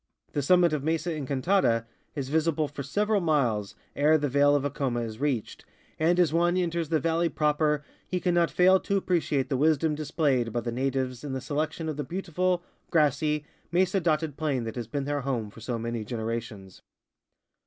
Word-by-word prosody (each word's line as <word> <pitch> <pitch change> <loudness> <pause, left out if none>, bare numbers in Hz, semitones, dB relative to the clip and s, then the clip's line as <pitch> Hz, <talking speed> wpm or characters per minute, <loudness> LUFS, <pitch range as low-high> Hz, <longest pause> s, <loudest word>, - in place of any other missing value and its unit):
The 145 - 0
summit 175 +2 +4
of 150 - 0
]\Iesa 165 +2 -1
En 145 -4 -5
cantada 130 - +2 0.3
is 135 -3 -3
visible 155 0 +1
for 145 0 -7
several 205 +8 0
miles 125 - 0 0.2
ere 150 +2 +4
the 145 -1 -1
vale 145 +2 +4
of 145 - +1
Aconia 130 -4 -1
is 110 0 -8
reached, 135 -6 -2 0.4
and 170 +3 +3
as 170 -3 +3
one 175 +2 +2
enters 170 -3 -1
the 160 - +2
valley 165 +1 +1
proper 150 0 +1 0.2
he 180 - -1
cannot 175 -2 +2
fail 185 +1 +5
to 200 - -1
appreciate 165 -8 0
the 135 - 0
wisdom 155 +2 +2
displayed 145 -5 0
by 120 - -1
the 120 +1 -3
natives 130 0 -2
in 140 -2 -4
the 130 - -2
selection 155 +4 -3
of 155 -2 -3
the 150 - -2
beautiful, 180 +2 -1 0.3
grassy, 150 -1 +2 0.3
mesa 185 +2 +2
dotted 155 -4 0
plain 145 -6 -1
that 115 -1 -5
has 120 -3 -4
been 140 +4 -3
their 145 0 -1
home 120 -6 -2
for 115 - -13
so 120 +1 -3
many 115 0 -3
generations. 110 -4 -5
150 Hz, 185 wpm, -27 LUFS, 130-165 Hz, 0.4 s, fail